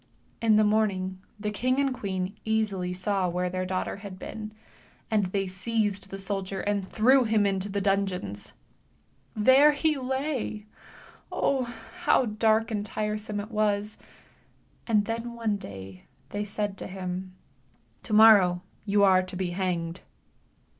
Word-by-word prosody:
In 225 -2 +4
the 215 - +5
morning 195 -3 +1 0.2
the 210 0 -2
king 255 +5 0
and 280 -1 +2
the - - -3
queen 190 0 -3
easily 210 -5 0
saw 185 0 0
where 180 +1 -1
their 185 0 -2
daughter 185 +1 -2
had 200 -2 -9
been, 215 +2 -7 0.6
and 210 -3 +2
they 195 +1 -1
seized 200 +1 -2
the 195 - -6
soldier 195 -1 -3
and 200 -2 -1
threw 255 +4 +5
i 215 -2 +3
into 195 0 -1
the 200 0 -1
dungeons. 190 - -1 0.8
Ehere 270 -2 +2 0.3
':. - - -22
Oh. 270 -2 +1 0.4
how 260 - +4
dark 220 +1 +2
and 210 -2 -1
tiresome 210 0 -3
it 210 +3 -6
was, 210 -1 0 0.9
and 210 -3 +3
then 230 +2 -4
one 225 -3 -1
dav 95 - -9 0.3
they 205 0 -3
said 205 -1 -3
to - - -5
him 185 0 -5 0.7
7 215 - -1
morrow 195 -5 +7 0.2
you 200 -1 +3
are 190 -1 +6
to 185 0 -7
be 180 -1 -2
hanged." 175 -2 -2
205 Hz, 145 wpm, -27 LUFS, 185-220 Hz, 0.9 s, morrow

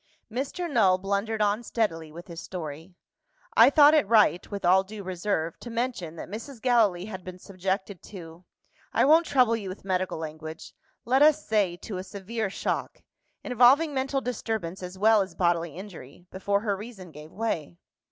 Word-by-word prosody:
Mr. 275 +9 -3
Null 205 - +3
blundered 200 +3 -1
on 205 +2 +1
steadily 165 -10 -2
with 170 +3 -10
his 170 -2 -8
story. 165 0 -7 0.6
"I - - +8
thought 290 +1 +7
it 300 -10 +3
right 210 -5 +3
(with 200 -3 -5
all 185 +2 +5
due 205 +1 -9
reserve) 180 -3 -2
to 240 - -9
mention 230 -9 -3
that - - -7
Mrs. 230 +6 -8
Gallilee 220 -7 +2
had 190 -3 -8
been 185 0 -8
subjected 190 0 -4
to 170 -3 -11 0.5
I - - +3
won't 320 +4 +5
trouble 250 -5 +3
you 205 -4 -5
with 185 +1 -9
medical 185 -2 -1
language 160 0 -8 0.3
let 260 +3 +3
us 305 0 +5
say, 200 -5 +1
to 195 +1 -7
a - - -5
severe 205 +2 -4
shock; - - -3 0.4
involving 260 +5 +4
mental 270 0 -1
disturbance 220 -8 -4
as 180 +1 -7
well 215 +1 +5
as 190 - -5
bodily 170 -3 0
injury, 175 -5 -11
before 200 +2 -1
her 205 -2 -1
reason 195 -4 -10
gave 150 +1 -12
way." 165 - -3
200 Hz, 170 wpm, -27 LUFS, 180-230 Hz, 0.6 s, I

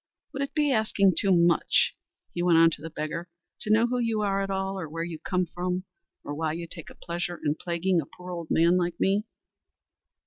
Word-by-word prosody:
"Would 275 - -3
it 275 - -3
be 295 -2 +2
asking 215 -5 +3
too 195 - +2
much," 170 -2 +3 0.4
he 175 - -2
went 175 -2 +4
on 165 0 +7
to 145 - -5
the 165 - -6
beggar, 160 +2 -4 0.3
"to - - -6
know 220 +2 +5
who 250 +1 -1
you 225 -3 0
are 195 -1 +1
at 195 - -2
all, 195 0 -2
or 160 -4 -5
where 165 +2 -3
you 165 -2 -6
come 180 +2 0
from, 180 +2 -3 0.4
or 145 - -5
why 155 +1 -1
you 170 +1 -5
take 165 -1 -8
a - - -14
pleasure 175 0 -4
in 145 - +3
plaguing 170 +2 0
a 140 - -10
poor 180 0 -10
old 170 -2 -5
man 170 +2 +4
like 175 -1 -1
me?" 200 +2 +2
175 Hz, 220 wpm, -27 LUFS, 165-195 Hz, 0.4 s, on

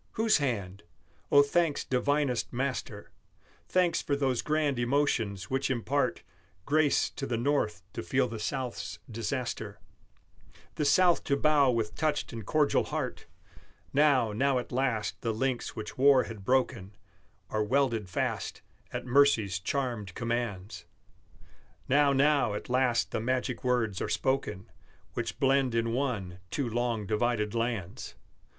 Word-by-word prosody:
Whose 220 0 +3
hand? 105 -9 -2 0.5
Oh, 145 0 +8
thanks 155 +1 +1
divinest 135 0 0
Master, 130 +1 -4 0.6
Thanks 180 -2 +2
for 140 - -1
those 135 -4 0
grand 150 -4 0
emotions 120 -6 0
which 135 +1 0
impart 135 +3 0 0.4
Grace 150 0 +2
to 135 - -5
the 120 - -1
North 115 -8 0
to - - -4
feel 130 +8 +1
the 115 -1 -6
South's 130 +2 -4
disaster, 120 +3 -4 0.9
The 150 - -1
South 175 +4 +4
to 140 - +1
bow 145 -2 +4
with 115 -3 0
touched 150 -5 -1
and 115 -1 -6
cordial 150 +8 +2
heart! - - -4 0.7
Now, 135 -6 +4
now 135 +4 +2
at 125 - -4
last 125 -4 -1
the 115 - -1
links 130 +1 -2
which 110 +2 -7
war 135 -1 +6
had 110 -3 -9
broken 120 -5 0 0.6
Are 110 0 +1
welded 115 -4 +1
fast, 90 - -3 0.3
at - - -4
mercy's 120 -8 +3
charmed 115 -3 -3
commands; 110 -6 -3 1.0
Now, 140 +1 +4
now 140 -5 +3
at 105 - -6
last 125 -1 +1
the - - -2
magic 125 0 -1
words 120 -6 0
are - - -2
spoken 105 -7 -1 0.4
Which - - -4
blend 135 -3 +2
in 115 0 0
one 110 -9 -2
two 140 - -2
long 115 -2 -1
divided 105 0 0
lands! 115 -6 -3
125 Hz, 135 wpm, -29 LUFS, 110-140 Hz, 1.0 s, Oh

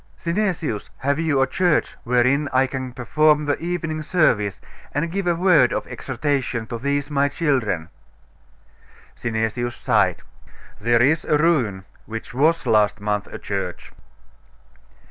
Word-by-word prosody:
Synesius, 170 - -2
have 140 +3 0
you 150 -5 +2
a - - +3
church 175 +4 +1
wherein 125 +4 +2
I 130 +1 +3
can 130 -1 -5
perform 150 +5 +2
the 145 -1 0
evening 165 -2 -3
service, 120 - +1 0.4
and 165 +3 -1
give 195 0 -2
a 175 - +3
word 170 -8 +4
of - - -2
exhortation 130 -3 -2
to 115 +1 -6
these 140 +3 -1
my 140 0 +2
children?' 130 - 0 1.3
Synesius 120 +1 -2
sighed. 95 -6 +1 0.6
'There 120 +2 +3
is 155 +4 +3
a 150 - +3
ruin, 125 - +1 0.2
which 115 +1 -7
was 155 +6 +2
last 105 -1 +3
month 105 0 -2
a - - -8
church. 95 -3 -5
135 Hz, 135 wpm, -22 LUFS, 115-155 Hz, 1.3 s, word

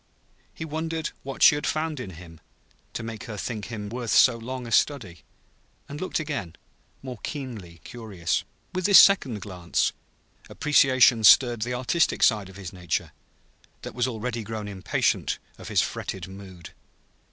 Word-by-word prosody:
He 160 - -7
wondered 160 +1 -3
what 135 0 -3
she - - +9
had 145 - -2
found 155 -2 -2
in 95 -8 -7
him 80 -2 -13 0.5
to 115 - -5
make 115 0 -7
her 110 -4 -7
think 105 0 -4
him 105 -3 -6
worth 120 +2 -5
so 125 +2 +6
long 125 +2 -6
a 115 - -8
study; 110 - 0 0.7
and 145 +3 -8
looked 185 - -2
again, 145 - -4 0.5
more 125 -4 -7
keenly 110 - -7
curious. 105 -8 -3 0.3
With 185 0 0
this 200 - +8
second 130 - +5
glance, 90 -4 -1 0.6
appreciation 130 -5 +4
stirred 120 +1 +6
the 125 +2 -2
artistic 130 +7 +1
side 105 -5 +3
of 95 - -14
his 95 -2 -8
nature, 90 -4 -3 0.7
that - - -7
was 125 +2 0
already 115 0 -4
grown 110 -1 -6
impatient 95 -2 -1 0.2
of - - -10
his - - +2
fretted 95 -2 -5
mood. 95 -3 -11
115 Hz, 155 wpm, -25 LUFS, 100-135 Hz, 0.7 s, she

